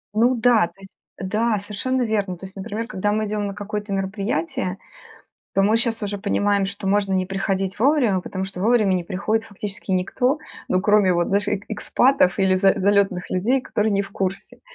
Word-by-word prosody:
Ну 240 +4 +4
да, 230 -5 +4
то 170 +3 -23
есть 195 0 -12 0.2
да, 215 +3 0
совершенно 235 +6 -2
верно. 205 -5 -1
То 190 - -9
есть, 190 - -10
например, 220 +3 -4
когда 205 -2 -1
мы 215 +1 0
идем 210 -1 -2
на 200 - -4
какое-то 210 0 -5
мероприятие, 195 -2 -2 0.8
то 195 - +3
мы 215 +3 +4
щас 230 -2 0
уже 205 0 -3
понимаем, 200 -1 +1
что 200 0 -6
можно 200 -1 +1
не 185 -1 +1
приходить 195 0 -2
вовремя, 245 -7 +3
потому 190 +1 -4
что 190 -1 -7
вовремя 215 -3 +3
не 175 -2 -1
приходит 215 +5 -1
фактически 205 -1 -7
никто, 250 +10 +1 0.3
ну, 185 - +2
кроме 205 -2 +4
вот, 175 0 +1
знаешь, 205 +1 +1
эк 205 0 -2
экспатов 220 -1 +2
или 190 -1 +3
за 195 0 +4
залётных 195 -2 +1
людей, 235 +9 +1
которые 215 -3 -1
не 200 0 +2
в 195 - -10
курсе. 195 -1 -4
200 Hz, 190 wpm, -22 LUFS, 190-215 Hz, 0.8 s, Ну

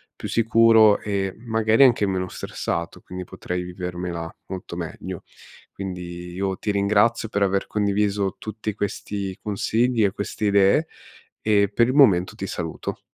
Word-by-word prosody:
più - - -6
sicuro 115 -2 +5
e, 100 -2 -2
magari, 110 +1 +3
anche 120 -4 +4
meno 95 -1 -1
stressato, - - -4
quindi 90 0 -7
potrei 90 0 -5
vivermela 90 -2 -5 0.2
molto 95 -2 -7
meglio. 85 -2 -6 0.5
Quindi, 90 -2 -7
io 95 0 -2
ti - - -4
ringrazio 105 +3 +2
per 100 - -2
aver 100 0 +1
condiviso 100 -1 0
tutti 110 -1 -5
questi 100 -2 -4
consigli 115 +3 +1
e 100 - +3
queste 100 +1 -4
idee 100 +10 +4 0.6
e 100 -2 +4
per 115 +3 +3
il 130 - 0
momento 100 -11 +4
ti 95 - -5
saluto. 80 -3 -5
100 Hz, 140 wpm, -23 LUFS, 90-110 Hz, 0.6 s, sicuro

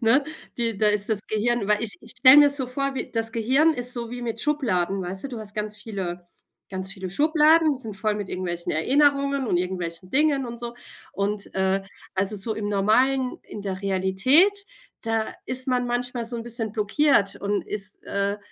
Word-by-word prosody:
ne? 255 +5 +3 0.3
Die 230 -4 -2
da 215 - +2
ist 210 +1 +2
das 210 -2 +1
Gehirn 215 0 0
weil 210 +1 +2
ich 215 - -1
ich 230 - -3
stell 260 +2 +9
mir 290 -1 +8
so 280 -3 +1
vor, 275 +2 -2
wie - - -4
das 225 -1 -1
Gehirn 270 +8 +3
ist 245 0 +1
so 235 -1 -4
wie 245 0 -6
mit 230 -1 -3
Schubladen, 195 -11 0
weißt 190 +4 -5
du? - - -3
Du 240 -3 -6
hast 210 -2 -7
ganz 210 0 -3
viele 180 -5 -6 0.4
ganz 190 0 -4
viele 190 -2 -6
Schubladen, 310 - +4
die 265 - -5
sind 215 -4 -6
voll 210 +2 0
mit 205 -2 -5
irgendwelchen 175 -2 -3
Erinnerungen 280 - +2
und 180 - +1
irgendwelchen 180 -1 -4
Dingen 280 -1 +2
und 235 0 -7
so 240 0 -5 0.4
und, 200 0 -3
äh 190 0 +1 0.3
also 195 +2 +1
so 220 +3 -1
im 205 -1 -3
Normalen, 250 +6 +2
in 210 - -9
der 195 -1 -5
Realität, 195 - +3 0.5
da 225 -1 -1
ist 255 +1 0
man 250 -1 +1
manchmal 245 0 -2
so 240 0 -5
‘n 230 - -5
bisschen 230 -2 -4
blockiert 215 0 +2
und 200 0 -2
ist, 200 -1 -3
äh 200 +1 -1
225 Hz, 200 wpm, -24 LUFS, 195-255 Hz, 0.5 s, stell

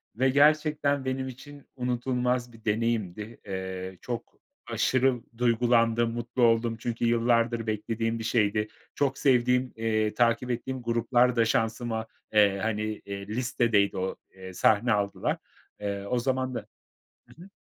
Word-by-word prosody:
ve 130 +3 +2
gerçekten 150 -1 +3
benim 130 0 -2
için 140 +3 -11
unutulmaz 125 -1 -1
bir 115 0 -17
deneyimdi. 110 -1 -1
Eee, 95 -1 -5
çok 120 -2 -6 0.3
aşırı 130 -1 +2 0.2
duygulandım, 115 -1 +3
mutlu 120 +1 -2
oldum 115 0 +3
çünkü 120 0 -2
yıllardır 115 0 +2
beklediğim 115 +2 -2
bir 115 - -5
şeydi. 105 -2 +1 0.3
Çok 135 -2 0
sevdiğim, 125 -1 +2
eee, 110 -1 0
takip 120 +2 +2
ettiğim 130 +2 -3
gruplar 120 +1 +2
da 115 -1 +3
şansıma, 110 0 -1 0.3
eee, 100 -2 +4
hani, 110 0 -1 0.2
eee, 100 0 -6
listedeydi 115 -3 +1
o, 95 +1 -2 0.2
eee, 95 -1 -9
sahne 110 +5 +3
aldılar. 100 -1 -1 0.4
Eee, 100 -1 -3
o 125 - +1
zaman 130 0 -1
da - - -4 0.6
I - - -17
hı. 195 +2 -14
115 Hz, 135 wpm, -27 LUFS, 110-125 Hz, 0.6 s, eee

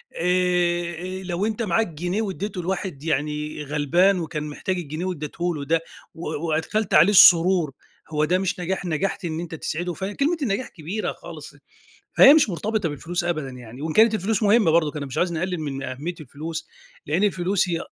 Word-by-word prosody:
آآ، 175 -1 +1 0.3
آآ، - - -10
لو 180 +2 -2
أنتَ 225 +1 -2
معاك 220 +3 +1
جنيه 175 +6 -3
وادِّيته 195 -2 -4
لواحد 180 -5 -3
يعني 150 0 -2
غلبان 165 +7 +2
وكان 155 -2 -4
محتاج 180 +5 -3
الجنيه 160 +1 -4
وادِّيته 175 0 -3
له 145 -2 -5
ده، 165 +3 +1 0.3
و 165 - -6 0.2
وأدخَلت 160 +8 -1
عليه 170 +7 +7
السرور، 175 -4 +6 0.4
هو 150 -1 +1
ده 180 +4 +2
مش 190 0 -2
نجاح؟ 185 +1 -2
نجَحت 175 +3 -2
إن 160 -1 -3
أنتَ 170 -1 -6
تسعِده. 175 +3 -3
فكلمة 240 - -1
النجاح 250 -1 -1
كبيرة 185 +6 -4
خالص. - - -11 0.6
فهي 275 - +9
مش 300 -8 +4
مرتبِطة 205 0 -1
بالفلوس 170 +4 -3
أبدًا 155 -6 -2
يعني، 125 +1 -11
وإن 160 0 -3
كانت 220 +3 +5
الفلوس 215 +2 -1
مهمَّة 210 -4 +4
برضه، 155 -2 +3
أنا 145 - -4
مش 135 - -7
عايِز 175 -1 +1
نقلِّل 180 +1 -2
من 140 -3 -4
أهمِّية 140 +6 -5
الفلوس، 155 +4 -6 0.4
لأن 165 +7 +1
الفلوس 190 -1 +1
هي 170 -1 -1
175 Hz, 175 wpm, -23 LUFS, 155-190 Hz, 0.6 s, فهي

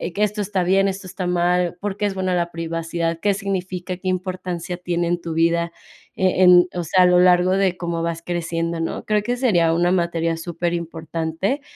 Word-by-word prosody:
que 210 - +1
esto 210 0 -1
está 195 -2 -1
bien, 195 +2 +3
esto 195 0 -4
está 185 0 -4
mal, 175 0 +1
¿por 200 0 -3
qué 205 - -1
es 195 - -4
buena 185 -1 -1
la 170 -1 0
privacidad? 165 0 -3
¿Qué 205 -1 +2
significa? 185 -2 -4
¿Qué 185 - -7
importancia 180 -1 -3
tiene 175 -1 -2
en 175 0 -1
tu 165 -1 -5
vida?, 170 +1 +1 0.4
eh, 185 0 +1
en, 180 -1 +7
o 175 - -2
sea, 185 +3 +3
a - - +6
lo 180 0 +5
largo 180 0 +5
de 190 -2 +1
cómo 170 -1 -3
vas 170 0 -3
creciendo, 170 -1 -2
¿no?, 165 - -3
creo 210 -1 +1
que 245 +2 -1
sería 175 -10 +3
una 175 +1 +2
materia 170 -2 0
súper 170 +1 -3
importante 165 - -3
175 Hz, 205 wpm, -21 LUFS, 170-185 Hz, 0.4 s, en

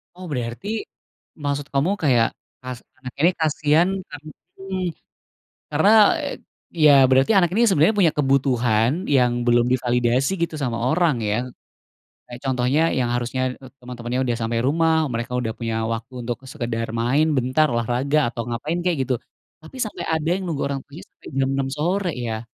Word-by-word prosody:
Oh 185 +1 -9
berarti, 120 - -4 0.8
maksud 145 0 -2
kamu 140 +7 +2
kayak 120 -5 +4 0.4
as 125 -2 -5 0.2
anak 130 -1 -8
ini 170 +5 +5
kasihan 155 +3 +2 0.2
karen 145 +1 -10 0.3
mmm, 190 -1 -4 0.9
karena 160 +8 +3 0.9
ya 150 - +8 0.2
berarti 130 +7 +4
anak 175 -3 +4
ini 230 - +3
sebenarnya 185 +3 +3
punya 165 -5 +4
kebutuhan 125 -5 +2 0.2
yang 125 -2 +4 0.2
belum 120 0 +4
divalidasi 125 +2 +1
gitu 165 - -3
sama 120 -3 -1
orang 165 -3 +2
ya. 105 - +1 0.9
Kayak 120 0 -8
contohnya 130 +3 +1 0.2
yang 120 - 0
harusnya 120 +1 -2 0.4
teman-teman 120 -1 -7
yang 130 - +1
udah 120 -2 -1
sampai 115 +1 -1
rumah, 160 +3 +2 0.2
mereka 120 +1 -4
udah 115 -2 -2
punya 115 -2 -3 0.2
waktu 115 +3 -7
untuk 120 0 -3 0.2
sekedar 115 -5 -3
main 135 +6 +2
bentar, 130 +5 +2
olahraga, 125 +5 0
atau 120 0 -5
ngapain 145 +9 -3
kayak 175 -3 +1
gitu. 130 0 -1 0.5
Tapi 160 +12 -13
sampai 215 - -6
ada 160 0 -1
yang 190 - -4
nunggu 160 -5 -3
orang 140 -1 -3
tuanya 145 +4 -12
sampai - - -17
jam 135 0 +1
6.00 135 -1 -1
sore 180 +4 0 0.2
ya. 110 0 -4
135 Hz, 160 wpm, -22 LUFS, 120-155 Hz, 0.9 s, ya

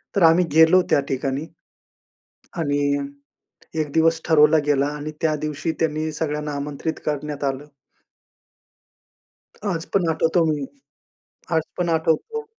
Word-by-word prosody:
तर 195 - +3
आम्ही 165 +2 +6
गेलो 160 +3 +6
त्या - - +5
ठिकाणी, 135 +3 -2 1.1
आणि 145 -2 0 0.7
1 150 - -2
दिवस 165 0 +3
ठरवला 155 -1 +6
गेला 140 -1 +2
आणि 150 +1 -6
त्या 160 -1 +2
दिवशी 155 +2 -2
त्यांनी 155 0 0
सगळ्यांना 150 -1 -3
आमंत्रित 145 +2 -4
करण्यात 150 -1 -3
आलं. 135 +1 -2 2.1
आज 165 -1 -3
पण 190 -4 +2
आठवतो 165 +1 +2
मी, 150 -3 -1 0.9
आज 160 - +3 0.2
पण 175 -1 0
आठवतो. 165 - 0
155 Hz, 120 wpm, -22 LUFS, 145-165 Hz, 2.1 s, आम्ही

